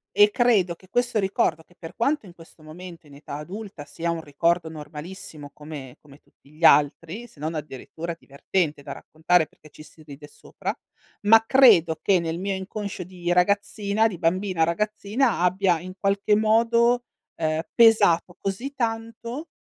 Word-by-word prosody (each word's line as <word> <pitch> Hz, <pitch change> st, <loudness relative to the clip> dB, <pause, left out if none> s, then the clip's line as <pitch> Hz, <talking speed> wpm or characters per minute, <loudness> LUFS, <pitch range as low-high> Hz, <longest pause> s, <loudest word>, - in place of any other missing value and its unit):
e 205 Hz, +1 st, +7 dB
credo 210 Hz, -7 st, +2 dB
che 185 Hz, +2 st, -22 dB
questo 245 Hz, +1 st, 0 dB
ricordo- 190 Hz, -5 st, 0 dB
che 175 Hz, -, -25 dB
per 165 Hz, -, -10 dB
quanto 275 Hz, +2 st, 0 dB
in 175 Hz, -, -14 dB
questo 165 Hz, -1 st, -18 dB
momento 170 Hz, +1 st, -11 dB
in 140 Hz, -, -15 dB
età 140 Hz, 0 st, -9 dB
adulta 185 Hz, +1 st, -8 dB
sia 170 Hz, +3 st, -3 dB
un 165 Hz, -1 st, -4 dB
ricordo 165 Hz, +3 st, 0 dB
normalissimo 155 Hz, +1 st, -9 dB
come 150 Hz, -4 st, -10 dB
come 145 Hz, -1 st, -18 dB
tutti 140 Hz, -, -27 dB
gli 155 Hz, +2 st, -14 dB
altri, 160 Hz, +8 st, +3 dB
se 160 Hz, -, -22 dB
non 155 Hz, +2 st, -4 dB
addirittura 155 Hz, +3 st, -6 dB
divertente 150 Hz, +1 st, -3 dB
da 140 Hz, -, -8 dB
raccontare 160 Hz, +2 st, 0 dB
perché 155 Hz, -, -20 dB
ci -, -, -15 dB
si 155 Hz, 0 st, -18 dB
ride 145 Hz, 0 st, -12 dB
sopra- -, -, -6 dB, 0.5 s
ma 225 Hz, +1 st, +7 dB
credo 195 Hz, -12 st, +5 dB
che 190 Hz, -3 st, +3 dB
nel 165 Hz, 0 st, -3 dB
mio 195 Hz, +1 st, -2 dB
inconscio 195 Hz, 0 st, -6 dB
di 175 Hz, -1 st, -5 dB
ragazzina 200 Hz, +3 st, +1 dB
di 200 Hz, -5 st, -6 dB
bambina, 185 Hz, 0 st, 0 dB
ragazzina 210 Hz, +7 st, 0 dB
abbia 180 Hz, -1 st, +2 dB
in 185 Hz, +2 st, -9 dB
qualche 200 Hz, +1 st, +1 dB
modo, 235 Hz, +3 st, +3 dB, 0.3 s
ehm, 155 Hz, -1 st, -1 dB
pesato 205 Hz, -7 st, +4 dB
così 200 Hz, +8 st, -4 dB
tanto 230 Hz, +4 st, -4 dB
180 Hz, 160 wpm, -24 LUFS, 160-210 Hz, 0.5 s, e